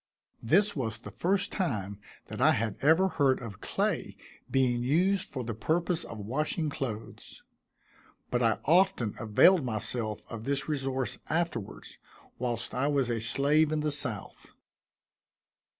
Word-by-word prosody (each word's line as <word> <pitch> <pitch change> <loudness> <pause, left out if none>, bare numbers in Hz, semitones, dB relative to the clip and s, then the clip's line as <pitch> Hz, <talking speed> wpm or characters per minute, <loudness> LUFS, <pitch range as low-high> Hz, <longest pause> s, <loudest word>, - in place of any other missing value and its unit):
This 200 - +3
was 115 -7 -2
the 105 - -10
first 190 - 0
time 105 - -2 0.3
that - - -7
I - - +6
had 110 -1 -1
ever 160 +6 +5
heard 140 -7 +2
of 110 -5 -9
clay - - -2 0.3
being 125 -2 +2
used 180 +9 +1
for 130 -3 -4
the 115 0 -4
purpose 170 - -1
of 115 - -8
washing 150 - -2
clothes; 115 -6 -6 0.9
but 120 - +1
I 115 -2 +3
often 170 - +3
availed 130 - +5
myself 110 -1 -3
of 115 -1 -7
this 140 0 0
resource 135 -3 -2
afterwards, 160 - -3 0.4
whilst 120 -2 -3
I 130 +3 0
was 140 -4 +1
a 115 - -1
slave 145 +7 +3
in 155 -1 0
the 150 0 0
south. 130 -9 -3
135 Hz, 140 wpm, -29 LUFS, 115-160 Hz, 0.9 s, I